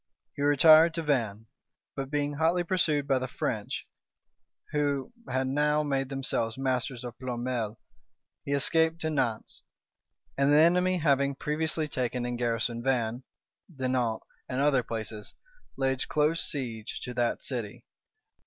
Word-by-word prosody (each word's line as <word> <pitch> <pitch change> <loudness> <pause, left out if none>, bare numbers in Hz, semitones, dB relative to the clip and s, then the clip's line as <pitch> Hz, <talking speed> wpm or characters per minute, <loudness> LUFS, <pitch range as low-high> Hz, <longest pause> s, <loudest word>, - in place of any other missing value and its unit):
He - - -5
retired 155 +3 +6
to 165 - -2
Vannes; 115 -8 0 0.5
but 135 -1 -4
being 145 0 -1
hotly 165 +4 +2
pursued 160 -5 +1
by 135 -2 +2
the 130 - -3
French, - - -3 0.8
who 145 - -1 0.2
had 130 +1 0
now 150 +2 +2
made 135 -2 -1
themselves 130 -4 -2
masters 130 -2 -1
of 120 -1 -7
Ploermel, 120 -3 -3 0.7
he 140 - -2
escaped 160 +3 +2
to 160 - -1
Nantz; 125 -7 -2 0.7
and 140 +1 +3
the 145 - +6
enemy, 180 +3 +4
having 140 -3 +2
previously 155 +2 -1
taken 125 -3 -2
and 120 0 -2
garrisoned 120 0 -1
Vannes, 120 -2 0 0.5
Dinant, 130 -5 -1 0.3
and 130 - -2
other 140 -2 +3
places, 110 -2 -6 0.4
laid 135 -1 0
close 155 +2 +1
siege 115 -6 -4
to 125 - -5
that 120 -1 0
city. 120 -6 -5
135 Hz, 135 wpm, -28 LUFS, 120-150 Hz, 0.8 s, retired